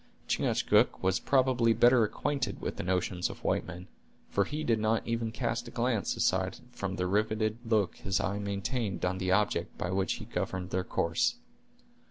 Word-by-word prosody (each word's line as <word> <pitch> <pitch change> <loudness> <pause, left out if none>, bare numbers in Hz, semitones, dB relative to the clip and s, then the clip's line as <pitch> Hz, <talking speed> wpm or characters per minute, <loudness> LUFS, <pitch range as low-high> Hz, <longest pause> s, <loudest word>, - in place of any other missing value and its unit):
Chingachgook - - +2
was 95 0 +2
probably 130 -4 +3
better 120 0 +5
acquainted 120 0 -2
with - - -4
the - - -2
notions 90 0 0
of - - -10
white - - 0
men, 90 +1 -8 0.4
for 100 - +2
he 150 +1 -4
did 115 -5 +2
not 110 +1 +1
even 115 -1 -1
cast 120 +2 -2
a - - -6
glance 120 -4 0
aside 95 0 +1
from 100 -6 -4
the 90 -1 -1
riveted 110 +3 0
look 110 -5 +1
his 95 0 -1
eye 100 +2 -1
maintained 100 +1 -2
on 90 +1 -1
the 95 0 0
object 105 +2 +1
by 90 - -2
which 95 0 +1
he - - -7
governed 95 -1 -3
their 95 0 0
course. 85 - 0
105 Hz, 180 wpm, -30 LUFS, 95-115 Hz, 0.4 s, better